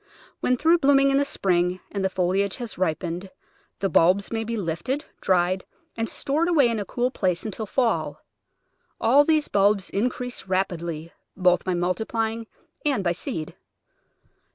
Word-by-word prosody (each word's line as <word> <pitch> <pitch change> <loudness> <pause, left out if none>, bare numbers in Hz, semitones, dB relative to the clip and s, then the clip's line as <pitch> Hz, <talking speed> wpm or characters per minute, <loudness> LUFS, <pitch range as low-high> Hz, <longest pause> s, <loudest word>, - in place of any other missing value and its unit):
When 250 - +1
through 330 +5 +4
blooming 275 -2 +4
in 275 - +3
the 285 - +2
spring, 180 -6 0
and 200 -2 -2
the 190 - +2
foliage 190 +2 0
has 240 -3 -6
ripened, 175 +1 -2 0.5
the 195 - +2
bulbs 185 +3 +3
may 225 -1 -1
be 230 +1 -3
lifted, 205 - -2 0.2
dried, 185 0 +2 0.3
and 225 0 -2
stored 305 +5 0
away 290 -8 +4
in 230 -2 -1
a 205 - -3
cool 245 +5 -1
place 185 -6 -1
until 215 0 -4
fall. 240 +1 -1 0.7
All 275 +5 +5
these 310 -1 +2
bulbs 200 -1 +2
increase 245 +1 -2
rapidly, 170 -4 -2 0.2
both 180 -1 +3
by 185 -1 -1
multiplying 220 +5 -1 0.4
and 275 -9 +1
by 175 - +2
seed. 160 -2 -5
200 Hz, 155 wpm, -24 LUFS, 180-250 Hz, 0.7 s, All